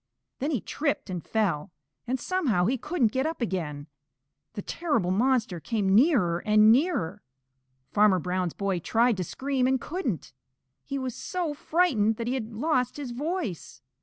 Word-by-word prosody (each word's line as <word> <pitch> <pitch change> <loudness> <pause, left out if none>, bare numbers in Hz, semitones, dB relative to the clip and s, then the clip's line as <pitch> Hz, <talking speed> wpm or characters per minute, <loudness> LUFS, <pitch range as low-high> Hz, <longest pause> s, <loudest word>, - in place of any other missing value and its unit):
Then 280 - -1
he 265 -10 0
tripped 285 -9 -2
and 180 -2 -4
fell, 180 -9 -1 0.4
and 255 +2 -1
somehow 255 - +1
he 245 +7 +2
couldn't 260 -3 0
get 265 +5 0
up 325 - -4
again. 165 - -3 0.7
The 205 -2 -5
terrible 235 - 0
monster 225 -3 +1
came 200 +1 0
nearer 215 - +4
and 215 +2 +5
nearer. 225 - +1 0.7
Farmer 205 -2 +5
Brown's 180 0 -2
boy 195 -3 -1
tried 230 +7 +2
to 185 - -1
scream 260 - -1
and 265 0 +2
couldn't. 255 - -4 0.5
He 275 - -4
was 260 -2 -3
so 350 +1 -3
frightened 285 -9 +2
that 230 - -4
he 245 - -1
had 235 -4 -3
lost 250 +2 0
his 280 -4 -5
voice. 290 - -4
230 Hz, 160 wpm, -27 LUFS, 190-275 Hz, 0.7 s, and